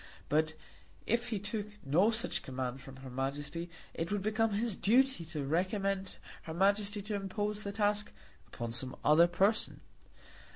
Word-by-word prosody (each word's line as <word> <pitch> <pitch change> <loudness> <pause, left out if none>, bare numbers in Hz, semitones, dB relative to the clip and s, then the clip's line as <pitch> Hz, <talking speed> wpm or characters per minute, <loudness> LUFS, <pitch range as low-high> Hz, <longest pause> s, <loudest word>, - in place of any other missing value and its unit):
But 155 +1 +2 0.5
if 235 +2 +1
he 220 - 0
took 205 +1 -3 0.2
no 170 +10 +4
such 230 0 0
command 130 0 -4
from 135 0 -10
her 130 0 -9
Majesty 145 +6 -3 0.2
it 165 +2 -3
would 205 -2 0
become 220 +1 +2
his 220 0 +1
duty 260 -1 +3
to 155 -3 -4
recommend 190 +4 0 0.3
her 160 - -6
Majesty 200 +2 +2
to 210 +1 -4
impose 205 +1 -2
the 200 - -4
task 210 0 +1 0.4
upon 120 -1 -5
some 130 +2 -1
other 160 +3 +7
person. 195 +5 +1
195 Hz, 155 wpm, -33 LUFS, 150-210 Hz, 0.5 s, other